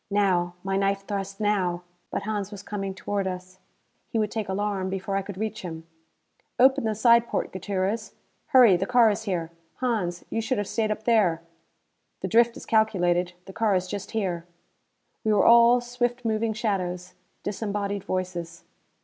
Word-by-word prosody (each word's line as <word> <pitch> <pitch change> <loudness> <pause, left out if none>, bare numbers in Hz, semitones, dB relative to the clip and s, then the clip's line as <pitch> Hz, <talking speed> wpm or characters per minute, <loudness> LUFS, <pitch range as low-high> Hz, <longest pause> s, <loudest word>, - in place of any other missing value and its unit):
Now! 185 -4 +1
My 195 0 0
knife 195 0 0
thrust 195 -1 -4
now! 185 -5 0 0.3
But - - -3
Hans 205 -2 -2
was 205 -2 -8
coming 195 -2 -4
toward 195 0 -2
us. 185 0 -7 0.5
He - - -2
would 215 -2 0
take 215 -3 -3
alarm 195 -1 -1
before 195 +1 -3
I 195 - +1
could 195 -1 -8
reach 215 +1 -3
him. 165 -3 -7 0.7
"Open 265 0 +5
the 220 -1 0
side 235 +1 +5
porte, - - -2
Gutierrez. 195 +3 -2 0.3
Hurry, 245 -7 +7
the 195 +3 -2
car 240 -3 +5
is 220 +2 -4
here. 170 -5 -2 0.2
Hans, 210 -9 -2
you 225 - 0
should 255 +3 -1
have 205 - -1
stayed 220 0 0
up 215 0 -3
there!" 200 -8 +3 0.8
"The - - -2
drift 235 +1 +3
is - - -10
calculated; 180 -5 +2
the 195 - -10
car 215 -2 +2
is 185 0 0
just 200 +1 -5
here." 180 -6 -2 0.8
We 215 - +2
were 205 - +4
all 235 +1 +7
swift 245 0 -2
moving 220 0 0
shadows; 185 -5 -2 0.3
disembodied 205 -1 -3
voices. 175 -3 -4
200 Hz, 170 wpm, -26 LUFS, 185-220 Hz, 0.8 s, Hurry